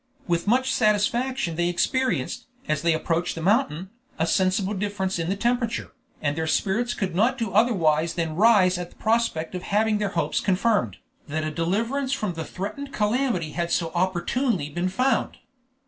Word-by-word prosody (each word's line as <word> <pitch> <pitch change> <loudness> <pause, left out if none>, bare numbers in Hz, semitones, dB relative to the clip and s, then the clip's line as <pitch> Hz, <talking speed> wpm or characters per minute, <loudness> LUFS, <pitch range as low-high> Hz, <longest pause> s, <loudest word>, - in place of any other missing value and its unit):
With 170 +1 0
much 260 +4 +2
satisfaction 220 -1 +1
they 175 0 +1
experienced, 260 +9 -1 0.2
as 155 -1 0
they 170 -1 +3
approached 165 +2 -1
the 165 - -5
mountain, 190 - +1 0.3
a 160 - +1
sensible 190 +3 +1
difference 190 -2 -2
in 165 +1 -2
the 195 - +1
temperature, 235 +1 -1 0.3
and 145 -1 0
their 160 0 -2
spirits 225 +8 0
could 190 -4 -2
not 220 +9 +2
do 225 -4 -2
otherwise 170 -8 +2
than 165 -2 -2
rise 190 -3 +5
at 175 -1 -5
the - - -22
prospect 220 -8 0
of 180 - -4
having 210 +2 +1
their 210 -1 0
hopes - - +1
confirmed, 190 - +1 0.3
that 155 +2 -2
a 155 - -2
deliverance 230 - -1
from 210 -8 -2
the 160 -1 -4
threatened 210 - -6
calamity 210 - 0
had 170 +1 -2
so 165 -2 0
opportunely 185 - 0
been 175 +4 -1
found. 255 +8 0
190 Hz, 170 wpm, -25 LUFS, 170-230 Hz, 0.3 s, rise